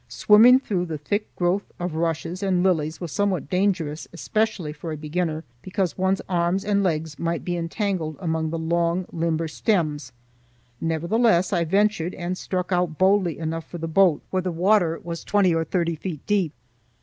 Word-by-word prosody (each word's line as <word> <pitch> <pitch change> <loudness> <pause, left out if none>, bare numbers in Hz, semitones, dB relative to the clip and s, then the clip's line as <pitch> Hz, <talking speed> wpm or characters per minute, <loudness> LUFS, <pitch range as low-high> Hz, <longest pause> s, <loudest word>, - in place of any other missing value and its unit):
Swimming 235 +5 +6
through 185 -9 -2
the 160 -2 -4
thick 205 +9 -2
growth 180 +3 0
of 175 -2 -3
rushes 165 +2 -2
and 185 -3 +1
lilies 160 -4 +1
was 175 -4 -5
somewhat 195 -7 -1
dangerous, 180 -5 0
especially 205 -3 -1
for 160 +2 -7
a 155 - -4
beginner, 155 +1 -2 0.2
because 185 0 -2
one's 190 +1 0
arms 175 +1 0
and 200 -1 +2
legs 160 -4 -1
might 170 0 -2
be 175 - -1
entangled 170 -2 -2
among 160 -3 -1
the 165 - -3
long, 170 +2 0
limber 165 -1 -1
stems; 155 -6 -1 0.7
nevertheless 175 +4 +2
I 170 -2 +2
ventured 195 -1 +1
and 180 0 -3
struck 185 0 -3
out 175 -3 0
boldly 190 -3 +3
enough 165 0 -4
for 175 - -6
the 165 0 -4
boat, 170 -1 +3
where 185 - +1
the 180 0 -2
water 175 -1 +2
was 170 -1 -5
twenty 200 -4 +3
or 165 0 +1
thirty 170 0 -1
feet 155 -2 -6
deep. 195 -7 +1
175 Hz, 175 wpm, -24 LUFS, 160-190 Hz, 0.7 s, Swimming